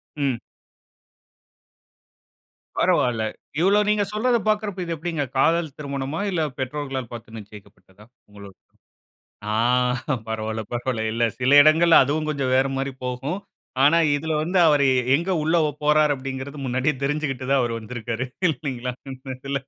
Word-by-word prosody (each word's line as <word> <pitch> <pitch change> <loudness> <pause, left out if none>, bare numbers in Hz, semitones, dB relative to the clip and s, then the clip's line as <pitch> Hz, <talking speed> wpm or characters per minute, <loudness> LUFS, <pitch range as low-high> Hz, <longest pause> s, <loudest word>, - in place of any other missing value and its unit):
ம். 135 -5 -1 2.4
பரவாயில. 120 -3 +2 0.4
இவ்வளவு 205 +4 +3
நீங்க 210 -1 +2
சொல்றத 240 +3 +2
பாக்குறப்போ, 210 -3 -1
இது 170 - -3
எப்டிங்க 160 -2 -3
காதல் 160 0 +2
திருமணமா? 140 +1 -4
இல்ல 170 - 0 0.2
பெற்றோர்களால் 135 -2 -4
பாத்து 115 -1 -9
நிச்சயிக்கப்பட்டதா? 100 -1 -16 0.2
உங்களோடையது. 100 -2 -14 0.9
ஆ! - - 0 0.7
பரவால்ல, 110 0 -3
பரவால்ல 120 -2 -2
இல்ல 115 +1 0 0.2
சில 130 +2 +1
இடங்கள்ல 160 +3 +6
அதுவும் 155 +3 -1
கொஞ்சம் 135 -4 -1
வேற 135 +1 +3
மாரி 135 +1 -2
போகும். 130 +8 -3 0.4
ஆனா 150 +4 +6 0.2
இதில 160 +2 -2
வந்து 180 +3 -1
அவரு 145 -2 +4
எ - - +1 0.2
எங்க 170 +5 -1
உள்ள 160 +2 +2 0.3
போறாரு 150 0 +4
அப்டின்கிறது 135 +2 -6
முன்னாடியே 130 +4 0
தெரிஞ்சுகிட்டு 140 -2 -2
தான் 140 - +4
அவர் 120 -1 -1
வந்திருக்காரு. 120 +2 -5 0.2
இல்லைங்களா? 130 -4 -4 0.2
இந்த 130 0 -7
இதுல. 140 +1 -4
135 Hz, 130 wpm, -23 LUFS, 125-155 Hz, 2.4 s, இடங்கள்ல